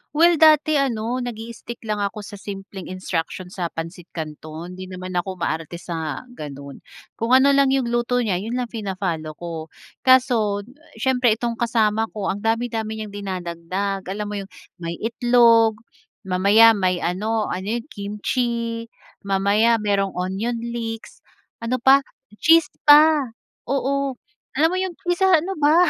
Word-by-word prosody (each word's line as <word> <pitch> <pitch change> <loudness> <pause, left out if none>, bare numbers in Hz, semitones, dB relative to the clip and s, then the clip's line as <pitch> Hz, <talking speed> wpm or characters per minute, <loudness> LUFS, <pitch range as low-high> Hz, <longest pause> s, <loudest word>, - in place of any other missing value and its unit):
Well, 335 +1 +5
dati 310 -1 +5
ano, 245 -2 -1
nagi-stick 235 0 -7
lang 215 -1 -2
ako 205 +1 -3
sa 205 -1 -10
simpleng 195 -1 -8
instruction 185 -1 -4
sa 180 -2 -3
pansit 165 +2 -7
canton. 155 +1 -7
Hindi 185 +1 -8
naman 185 0 -7
ako 185 +1 -2
maarte 165 -1 -3
sa 165 - -5
ganun. 140 - -9 0.4
Kung 230 +3 +3
ano 270 +2 +6
lang 275 0 +4
yong 265 -3 +1
luto 240 +1 +1
niya, 190 -5 0
yun 225 +5 -4
lang 250 -2 -3
fina-follow 185 -8 -3
ko. 165 -1 -6 0.4
Kaso, 230 -6 +4 0.3
siyempre 250 -1 +2
itong 235 0 -3
kasama 225 -2 +1
ko 205 -2 -1
ang 200 - -4
dami-dami 225 0 -1
niyang 215 -1 -6
dinadagdag. 190 0 -4
Alam 205 +3 -3
mo - - -4
yong 195 - -7 0.3
may 170 -1 -4
itlog. 230 -2 +4 0.4
Mamaya 200 +4 +6
may 185 -4 0
ano 215 +5 -1
ano 195 +5 -2
yun 240 - -3
kimchi. 230 +3 -2 0.3
Mamaya 200 +3 +2
merong 195 -2 0
onion 190 +6 -2
leeks. 230 -1 -5 0.4
Ano 230 +2 -1
pa, 265 +3 +6 0.4
cheese 330 -1 +5 0.2
pa. 295 -5 +6 0.3
Oo, 275 +1 0 0.4
alam 305 +4 +4
mo 370 - -1
yong 375 -2 -3 0.2
isa, 380 +2 +2
ano 360 0 +2
ba? 300 +1 +4
220 Hz, 145 wpm, -22 LUFS, 185-245 Hz, 0.4 s, ano